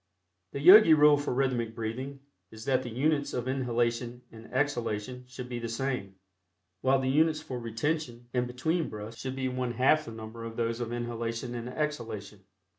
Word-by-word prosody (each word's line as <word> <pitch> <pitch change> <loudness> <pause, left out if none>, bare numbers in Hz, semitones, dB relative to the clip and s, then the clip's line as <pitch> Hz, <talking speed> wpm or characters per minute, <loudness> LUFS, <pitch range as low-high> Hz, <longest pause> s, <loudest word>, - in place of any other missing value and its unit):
The - - -3
Yogi 180 0 +9
rule 150 0 +7
for 145 0 -2
rhythmic 125 -3 0
breathing 130 +5 -5 0.3
is 110 +1 -11
that 130 -1 +2
the 125 - -6
units 145 +4 0
of 125 0 -2
inhalation 120 -1 -1
and 115 0 -13
exhalation 125 -3 -1
should 125 0 -8
be 120 -1 -4
the 115 0 -4
same, 115 -5 -3 0.7
while 135 +1 +4
the 130 - -1
units 155 +3 +3
for 125 -2 -5
retention 120 +2 -2
and 125 -1 +1
between 160 +7 -1
breaths 105 +2 -8
should 130 0 -4
be 130 -1 -1
one 125 -1 -2
half 150 +6 +3
the - - -7
number 110 +1 -8
of 115 0 -6
those 115 0 -1
of 120 -1 -3
inhalation 120 0 -3
and 120 0 -5
exhalation. 125 -7 -4
125 Hz, 180 wpm, -29 LUFS, 115-135 Hz, 0.7 s, Yogi